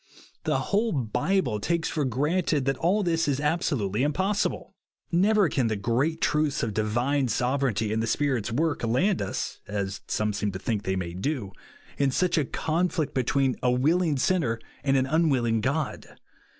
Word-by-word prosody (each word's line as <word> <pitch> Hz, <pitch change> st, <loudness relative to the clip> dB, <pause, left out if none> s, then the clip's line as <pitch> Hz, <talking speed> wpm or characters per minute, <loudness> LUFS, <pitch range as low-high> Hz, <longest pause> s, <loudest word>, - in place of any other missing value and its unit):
The -, -, +2 dB, 0.2 s
whole 220 Hz, +3 st, +2 dB
Bible 125 Hz, -, 0 dB
takes 170 Hz, +7 st, 0 dB
for 155 Hz, -, -1 dB
gi'anted 150 Hz, +3 st, 0 dB
that 135 Hz, -1 st, 0 dB
all 190 Hz, +7 st, +2 dB
this 165 Hz, -2 st, +1 dB
is 140 Hz, -1 st, 0 dB
absolutely 140 Hz, -, 0 dB
impos 190 Hz, +9 st, +1 dB
sible. -, -, -9 dB, 0.4 s
Never 200 Hz, +3 st, +4 dB
can 130 Hz, -5 st, 0 dB
the 110 Hz, -, 0 dB
great 120 Hz, +10 st, 0 dB
truths 150 Hz, -2 st, +1 dB
of 110 Hz, -3 st, -1 dB
divine 120 Hz, +6 st, +1 dB
sovereignty 120 Hz, -3 st, 0 dB
and 110 Hz, -, 0 dB
the 115 Hz, -, -1 dB
Spirit's 125 Hz, -4 st, 0 dB
work 155 Hz, +4 st, 0 dB
land 175 Hz, -, +1 dB
us, -, -, -3 dB
as 100 Hz, -1 st, -3 dB
some 105 Hz, 0 st, 0 dB
seem 105 Hz, 0 st, -1 dB
to -, -, -3 dB
think 105 Hz, +1 st, -2 dB
they 95 Hz, -, 0 dB
may 85 Hz, -2 st, -3 dB
do, 105 Hz, -, -3 dB, 0.5 s
in 140 Hz, -1 st, +3 dB
such 170 Hz, +5 st, +1 dB
a 145 Hz, -, 0 dB
conflict 160 Hz, 0 st, -1 dB
between 130 Hz, +1 st, +1 dB
a 125 Hz, -, +2 dB
willing 150 Hz, +5 st, +2 dB
sinner 130 Hz, -6 st, +1 dB, 0.2 s
and 135 Hz, -1 st, +3 dB
an 130 Hz, -, +2 dB
unwilling 130 Hz, -7 st, +2 dB
God. 140 Hz, +4 st, -2 dB
135 Hz, 170 wpm, -26 LUFS, 115-165 Hz, 0.5 s, Never